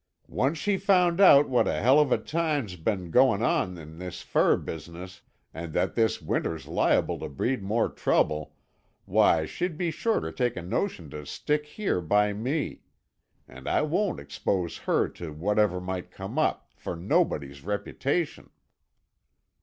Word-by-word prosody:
Once 140 +5 0
she 200 +5 0
found 185 -2 +3
out 145 -7 +8
what 125 -2 +2
a - - +1
hell 130 +6 +5
of 150 -3 +3
a - - +4
time's 150 - -2
been 90 0 -2
goin' 125 -3 +4
on 90 -6 0
in 80 0 -11
this 90 -1 -7
fur - - +3
business, 85 +3 -8 0.3
and 80 -1 -7
that 90 +4 0
this 110 -2 +1
winter's 80 -1 -2
liable - - +1
to - - -5
breed 120 - -1
more 105 +4 +1
trouble, 75 -1 0 0.5
why 80 -2 +3
she'd 175 - -3
be 175 -1 -1
sure 225 +8 0
to 80 - -5
take 120 +6 -1
a - - -3
notion 90 - -2
to 75 +1 -8
stick 150 - -2
here 170 - -2
by 105 +5 +2
me. 130 +9 -3 0.7
An' 65 +1 -12
I - - +2
won't 180 +6 0
expose 85 +4 -2
her - - +3
to 80 -3 -8
whatever 100 +3 +1
might 90 0 -5
come 95 +10 -5
up, 155 - 0
for - - -6
nobody's 85 - 0
reputation." 140 - -2
105 Hz, 160 wpm, -27 LUFS, -, 0.7 s, out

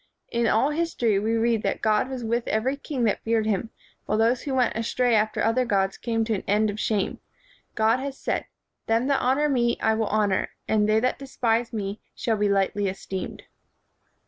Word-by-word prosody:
In 235 0 +1
all 260 +7 +3
history 295 -10 +1
we 220 +3 0
read 230 -1 +2
that - - -2
God 215 +3 +2
was 260 -2 -5
with 235 +1 -1
every 240 +6 0
king 280 -2 -4
that 215 - +1
feared 225 -1 +1
him, 220 +1 -1 0.4
while 215 - +1
those 230 +3 +2
who 275 -2 -3
went 250 -2 +2
astray 235 +2 +1
after 215 0 +1
other 225 +4 +2
gods 195 -4 +1
came 225 -1 -1
to 225 - 0
an 195 - -3
end 210 +1 +2
of 205 - -7
shame. 210 -3 -1 0.6
God 225 +3 +3
has 275 0 -5
said, - - -2 0.4
'Them 225 +2 +2
that 280 0 +1
honor 270 +4 +2
me 240 -4 +1
I 220 - +2
will 220 -1 0
honor; 205 -3 +1 0.2
and 215 -1 +2
they 215 +1 +4
that 255 +1 0
despise 240 -4 0
me 205 -2 -4
shall 225 -2 0
be 205 0 +1
lightly 200 +1 +1
esteemed.' 190 0 -5
225 Hz, 200 wpm, -25 LUFS, 215-245 Hz, 0.6 s, they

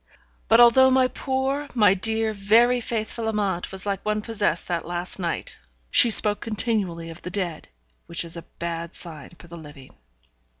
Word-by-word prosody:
But, 225 - +5
although 240 +2 +7
my 260 0 +3
poor, 270 +2 -2
my 210 -5 +5
dear, 220 +3 -2
very 230 +5 +3
faithful 225 0 -4
Amante 200 -5 -2
was 190 0 -8
like 200 -2 -3
one 215 0 -2
possessed 210 -7 -2
that 175 -2 -2
last 175 +2 -5
night, 170 -2 -4 0.4
she 240 - +7
spoke 210 -1 +4
continually 200 -7 -2
of 165 - -12
the - - -6
dead, 180 -4 -3 0.4
which 170 0 -1
is 165 0 -2
a 170 - -6 0.2
bad 170 0 -5
sign 155 -6 -7
for - - -15
the 170 0 -11
living. 145 -4 -13
205 Hz, 170 wpm, -24 LUFS, 170-225 Hz, 0.4 s, although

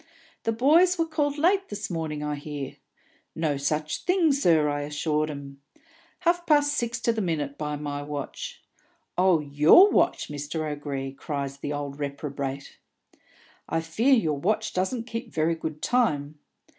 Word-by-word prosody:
'The 225 - +2
boys 320 +10 +4
were 330 - +2
called 295 -2 -1
late 380 +5 +2
this 205 0 -4
morning, 155 -3 -3
I 150 0 -2
hear.' 145 -1 -6 0.6
'No 155 -3 0
such 150 +2 -2
thing, 355 -5 +3
sir,' 165 - +3
I 145 0 -1
assure 150 +1 -1
'um. 140 -1 -9 0.6
'Half 345 0 +1
past 290 -1 +4
six 235 -4 -1
to 235 - +2
the 220 - -2
minute, 150 -6 -2
by 150 0 -3
my 145 -1 -4
watch.' 150 - -6 0.5
'Oh, 180 -3 +4
your 150 - +6
watch, - - +2
Mr. 150 +2 -4
O'Gree,' 140 -2 -4
cries 140 -1 -4
the 145 +1 -5
old 145 -1 -5
reprobate. 140 -1 -5 0.9
'I 165 - 0
fear 220 +12 +3
your 155 - 0
watch 215 +6 0
doesn't 225 +6 -1
keep 230 0 -6
very 160 +1 +1
good 160 -2 -6
time.' 150 - +1
155 Hz, 155 wpm, -26 LUFS, 145-235 Hz, 0.9 s, your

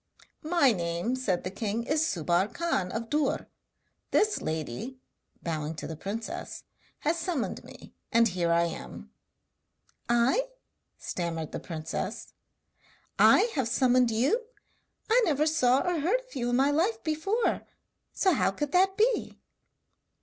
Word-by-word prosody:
'My 315 -4 +3
name,' 175 +4 -1
said 200 -9 -1
the 185 - -4
king, 215 +3 -2
'is 305 +5 +1
Subbar 175 - +1
Khan 335 - -1
of 225 0 -4
Dûr. 295 -2 +1 0.6
This 425 -1 +2
lady,' 160 - -4 0.5
bowing 155 -1 -3
to 150 - -6
the 160 - -5
princess, 225 - -5 0.4
'has 325 +3 0
summoned 335 -7 -2
me, - - -13 0.2
and 230 -1 +5
here 175 -2 0
I 170 0 +4
am!' 170 - -6 1.0
'I?' 240 - +3 0.5
stammered 165 -3 -4
the - - -4
princess 160 -3 -5 0.9
'I 470 - +6
have 265 -6 0
summoned 250 0 +3
you? 275 - +1 0.6
I 470 +3 +4
never 305 -6 +2
saw 270 -5 +3
or 350 -2 +1
heard 380 +12 +1
of - - -18
you 240 -2 -1
in 245 - +1
my 270 +3 +3
life 385 +10 +1
before, 335 +9 0 0.5
so 380 -2 +2
how - - +2
could 295 -1 -3
that 380 +2 +3
be?' 465 +3 +1
255 Hz, 140 wpm, -28 LUFS, -, 1.0 s, I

